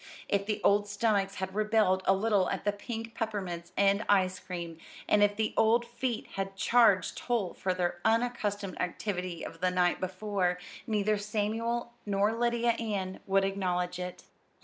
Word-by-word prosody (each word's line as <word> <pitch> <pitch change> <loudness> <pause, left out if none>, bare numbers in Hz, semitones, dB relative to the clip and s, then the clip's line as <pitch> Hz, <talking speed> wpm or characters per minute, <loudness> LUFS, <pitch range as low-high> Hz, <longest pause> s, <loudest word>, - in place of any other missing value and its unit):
If 200 0 0
the 210 -1 -1
old 205 +1 +4
stomachs 205 -2 +1
had 190 0 -4
rebelled 210 -3 +2
a 195 - +6
little 205 -1 +2
at - - -3
the 205 - +3
pink 225 +2 -6
peppermints 190 -7 -4
and 200 +1 +3
ice 190 -2 +3
cream, 170 -3 -6 0.3
and 210 - +4
if 205 0 +4
the 220 0 -1
old 230 +2 +4
feet 240 0 -3
had 195 0 -3
charged 215 -2 +4
toll 230 -7 -1
for 185 - -2
their 175 -1 -1
unaccustomed 220 -4 0
activity 180 -1 -3
of 165 - -9
the 185 - +3
night 180 -1 +2
before, 185 -1 -1 0.3
neither 210 -1 +1
Samuel 225 +3 -2
nor 205 +1 +1
Lydia 235 0 +2
Ann 205 -5 -3
would 195 0 +3
acknowledge 180 -2 -1
it. 180 0 -6
205 Hz, 160 wpm, -30 LUFS, 185-220 Hz, 0.3 s, a